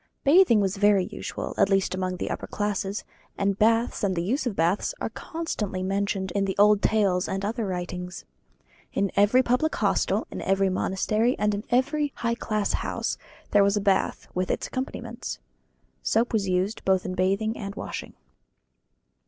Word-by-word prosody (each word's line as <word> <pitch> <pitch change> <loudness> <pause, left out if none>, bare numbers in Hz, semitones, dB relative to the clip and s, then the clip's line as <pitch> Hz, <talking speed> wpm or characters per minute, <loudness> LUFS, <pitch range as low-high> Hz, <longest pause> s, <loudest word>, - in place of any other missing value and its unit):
Bathing 295 - +6
was 195 0 0
very 205 -2 +4
usual, - - -5
at - - +4
least 195 -1 +2
among 185 0 -2
the - - -3
upper - - -4
classes, 205 -1 -2 0.3
and 200 0 0
baths 225 +2 +2
and 190 -2 +1
the 170 - -1
use 255 - 0
of 220 - -2
baths 170 +4 +1
are - - -3
constantly 215 - -4
mentioned 195 -1 -1
in 200 +1 0
the 190 - -2
old 205 0 +5
tales 195 -4 +2
and 195 +1 -2
other 225 0 -2
writings. 180 0 -5 0.7
In 195 -1 0
every 215 +6 +5
public 250 +6 +1
hostel, - - +1
in - - -5
every 195 0 +2
monastery, 215 +6 +1
and 210 0 +1
in 205 +1 -3
every 285 +4 +1
high 235 0 -1
class 215 -3 -1
house, - - -2 0.3
there 205 -1 +6
was 200 +1 +2
a - - +2
bath, 195 -1 +1
with 185 0 -1
its - - -1
accompaniments. 240 -2 -5 0.6
Soap 230 +2 +1
was 200 -4 +1
used 185 +4 0
both 190 -1 +2
in 185 - -3
bathing 195 +4 +1
and 200 -2 -6
washing. - - -6
200 Hz, 170 wpm, -26 LUFS, 190-225 Hz, 0.7 s, Bathing